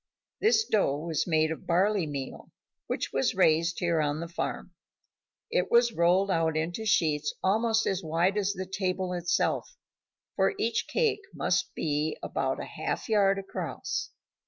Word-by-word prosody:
This 445 Hz, +1 st, +3 dB
dough 195 Hz, -, +1 dB
was 160 Hz, +1 st, -2 dB
made 155 Hz, -1 st, +2 dB
of 160 Hz, -, -7 dB
barley 185 Hz, 0 st, +2 dB
meal 140 Hz, -2 st, -6 dB, 0.4 s
which -, -, -3 dB
was -, -, +1 dB
raised 165 Hz, +2 st, +3 dB
here 170 Hz, -2 st, +1 dB
at 145 Hz, 0 st, -1 dB
the 170 Hz, -, -4 dB
farm. 170 Hz, -, -4 dB, 0.8 s
It -, -, +1 dB
was 235 Hz, 0 st, +4 dB
rolled 185 Hz, +3 st, +3 dB
out 160 Hz, -2 st, +1 dB
into 175 Hz, +8 st, -2 dB
sheets 150 Hz, -6 st, +1 dB
almost 225 Hz, +3 st, +2 dB
as 190 Hz, -1 st, 0 dB
wide 170 Hz, +4 st, +1 dB
as 200 Hz, -1 st, 0 dB
the 190 Hz, -1 st, -5 dB
table 185 Hz, -1 st, -2 dB
itself, 175 Hz, 0 st, -1 dB, 0.6 s
for 195 Hz, 0 st, +2 dB
each 225 Hz, 0 st, 0 dB
cake 435 Hz, -4 st, +1 dB
must -, -, 0 dB
be 150 Hz, 0 st, -1 dB
about -, -, -1 dB
a -, -, -4 dB
half -, -, -4 dB
yard 200 Hz, -2 st, +3 dB
across. 195 Hz, 0 st, -4 dB
180 Hz, 155 wpm, -28 LUFS, 160-205 Hz, 0.8 s, was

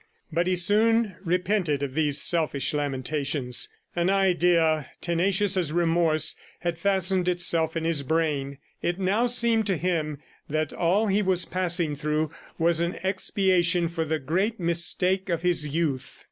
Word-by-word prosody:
But 170 Hz, +2 st, +1 dB
he 185 Hz, -, +2 dB
soon 215 Hz, +3 st, +2 dB
repented 180 Hz, -4 st, 0 dB
of 135 Hz, -2 st, -4 dB
these 150 Hz, -1 st, +1 dB
selfish 155 Hz, -6 st, +1 dB
lamentations. 140 Hz, -2 st, -2 dB, 0.3 s
An 175 Hz, +1 st, +1 dB
idea, 175 Hz, -6 st, +2 dB
tenacious 190 Hz, +3 st, +1 dB
as 175 Hz, -5 st, 0 dB
remorse, 165 Hz, -2 st, +2 dB, 0.3 s
had 170 Hz, -1 st, -3 dB
fastened 190 Hz, -1 st, 0 dB
itself 170 Hz, -2 st, +1 dB
in 165 Hz, -, -3 dB
his 165 Hz, -3 st, 0 dB
brain. 140 Hz, -2 st, -1 dB, 0.2 s
It 175 Hz, 0 st, -1 dB
now 200 Hz, +6 st, +1 dB
seemed 235 Hz, -3 st, +2 dB
to 190 Hz, -3 st, +1 dB
him 155 Hz, -4 st, -2 dB, 0.3 s
that 155 Hz, 0 st, -2 dB
all 185 Hz, +6 st, +1 dB
he 205 Hz, 0 st, +1 dB
was 185 Hz, -3 st, +1 dB
passing 175 Hz, -4 st, -1 dB
through 150 Hz, +1 st, -2 dB, 0.3 s
was 165 Hz, 0 st, +2 dB
an 170 Hz, +1 st, -1 dB
expiation 185 Hz, -2 st, +1 dB
for 165 Hz, -1 st, -3 dB
the 160 Hz, 0 st, -1 dB
great 185 Hz, -, -1 dB
mistake 180 Hz, +3 st, +2 dB
of 170 Hz, -1 st, -1 dB
his 170 Hz, -4 st, +2 dB
youth. 145 Hz, -3 st, -3 dB
170 Hz, 145 wpm, -25 LUFS, 155-185 Hz, 0.3 s, he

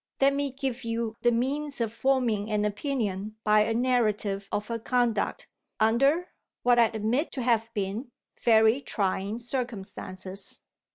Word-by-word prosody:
Let 275 Hz, 0 st, +5 dB
me 280 Hz, 0 st, 0 dB
give 265 Hz, -2 st, -4 dB
you 230 Hz, -1 st, -2 dB
the 240 Hz, -, +4 dB
means 280 Hz, +5 st, -1 dB
of 225 Hz, -2 st, -1 dB
forming 235 Hz, -5 st, +1 dB
an 210 Hz, -1 st, +1 dB
opinion 210 Hz, -3 st, -2 dB
by 215 Hz, 0 st, +5 dB
a 225 Hz, +1 st, +2 dB
narrative 215 Hz, -5 st, +1 dB
of 210 Hz, -, -2 dB
her 230 Hz, 0 st, -2 dB
conduct, 240 Hz, -2 st, 0 dB, 0.3 s
under 275 Hz, +11 st, +3 dB, 0.3 s
(what 245 Hz, -1 st, +5 dB
I 235 Hz, -, +7 dB
admit 225 Hz, +7 st, -1 dB
to 260 Hz, -, -3 dB
have 230 Hz, -2 st, +2 dB
been) 205 Hz, +5 st, -3 dB, 0.3 s
very 225 Hz, +2 st, +5 dB
trying 200 Hz, -2 st, -1 dB
circumstances. 195 Hz, -6 st, -5 dB
230 Hz, 145 wpm, -28 LUFS, 210-255 Hz, 0.3 s, I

